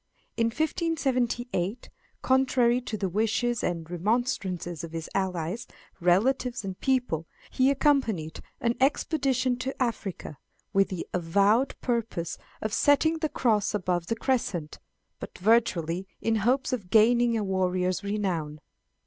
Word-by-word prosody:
In 230 -1 +2
1578, 250 - -1 0.3
contrary 255 -2 +3
to 220 -3 -4
the 195 - -1
wishes 225 +5 0
and 170 -2 -2
remonstrances 180 - -1
of 165 -1 -7
his 165 -1 -4
allies, 185 +2 -2 0.3
relatives, 215 +6 +2
and 190 -1 -6
people, 245 - 0 0.2
he 260 +1 +3
accompanied 260 - +1 0.2
an 235 0 +1
expedition 265 -3 +1
to 265 +2 -4
Africa, 210 - -3 0.3
with 195 -1 +3
the 185 -3 -4
avowed 200 +9 +2
purpose 225 -9 -2 0.2
of 215 -1 -2
setting 315 +5 +3
the 310 -1 -1
Cross 215 -6 +1
above 180 -3 -1
the 230 - 0
Crescent, 210 - -2 0.4
but - - -8
virtually 190 -4 +2
in 225 0 +1
hopes 255 +6 +1
of 205 -8 -4
gaining 235 +2 +4
a 215 - -1
warrior's 185 -1 0
renown. 180 -7 -2
220 Hz, 125 wpm, -27 LUFS, 180-250 Hz, 0.4 s, gaining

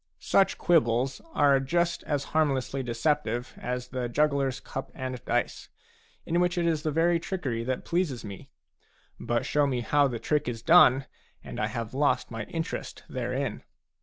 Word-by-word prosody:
Such 195 - +2
quibbles 130 -5 +2
are 140 -2 +5
just 170 +5 0
as 145 -2 -1
harmlessly 135 -3 +1
deceptive 120 0 -1
as 125 0 -4
the 125 -2 -3
jugglers 140 0 +1
cup 135 - -6
and 130 -2 -5
dice, - - -1 0.6
in 170 +1 +1
which 180 0 +1
it 170 - +1
is 160 -3 +1
the 155 - -1
very 165 +3 +2
trickery 135 -11 -3
that 130 0 -2
pleases 170 -10 -1
me. 100 -2 -9 0.7
But 120 0 -1
show 145 -1 +2
me 125 -3 -1
how 145 +4 +3
the 120 -3 -3
trick 150 +4 0
is 115 -2 -4
done, 135 -5 +6 0.4
and - - -7
I - - +1
have 115 0 -5
lost 140 -2 +1
my 115 -2 -4
interest 165 -1 -5
therein. - - -3
135 Hz, 165 wpm, -28 LUFS, 125-160 Hz, 0.7 s, done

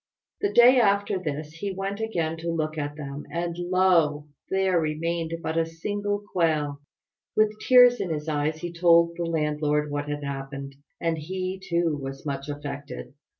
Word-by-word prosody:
The 405 - 0
day 250 +2 +7
after 200 -3 +2
this 150 -3 -4
he 195 +4 -4
went 195 +2 -4
again 170 -8 -1
to 170 +1 -4
look 155 -1 -2
at 145 -1 -3
them, 145 -1 -7
and 170 0 -2
lo! 175 -5 +2 0.2
there 190 -2 +2
remained 165 +1 -1
but 160 +1 0
a 165 - +2
single 205 +5 -3
quail. 150 -5 +1 0.5
With 215 0 +2
tears 245 +1 +6
in 180 - -2
his 150 -1 -3
eyes 155 +1 -1
he 175 -1 -5
told 170 0 +4
the 170 - -2
landlord 150 -2 0
what 145 0 -3
had 145 0 -3
happened, 140 0 -5 0.3
and 165 -1 -1
he, 185 +4 -4
too, 170 -5 0
was 135 +1 -7
much 140 0 -4
affected. 145 -1 -6
165 Hz, 165 wpm, -26 LUFS, 150-185 Hz, 0.5 s, day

